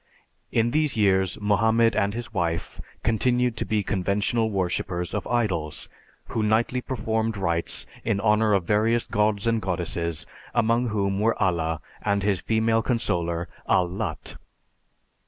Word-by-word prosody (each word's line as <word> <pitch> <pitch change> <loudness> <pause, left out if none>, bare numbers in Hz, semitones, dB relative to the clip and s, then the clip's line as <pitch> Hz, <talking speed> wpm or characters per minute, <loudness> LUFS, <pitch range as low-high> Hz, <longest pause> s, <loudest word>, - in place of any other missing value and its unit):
In 115 +1 +2
these 150 -2 +1
years 95 -3 +2
Mohammed 110 +2 +3
and 100 +1 +1
his 120 -1 -6
wife 85 -4 -2 0.2
continued 125 +2 +2
to - - -1
be 105 -2 0
conventional 105 +4 0
worshipers 90 -2 -2
of - - -3
idols, 95 -11 -1 0.4
who 115 - -1
nightly 110 +4 +1
performed 110 -3 -2
rites 85 -3 -1 0.2
in 110 -3 0
honor 105 0 +3
of 100 -3 +2
various 110 +5 +2
gods 105 0 +1
and 115 -1 +1
goddesses, 85 -3 -2 0.3
among 120 +1 +2
whom 100 -3 0
were 115 +2 +1
Allah 80 -3 0 0.2
and 100 -1 0
his 100 -3 +1
female 115 0 +2
consoler 85 -9 -1 0.2
Al 90 - +4
Lat. 100 +4 -5
105 Hz, 135 wpm, -25 LUFS, 95-115 Hz, 0.4 s, Al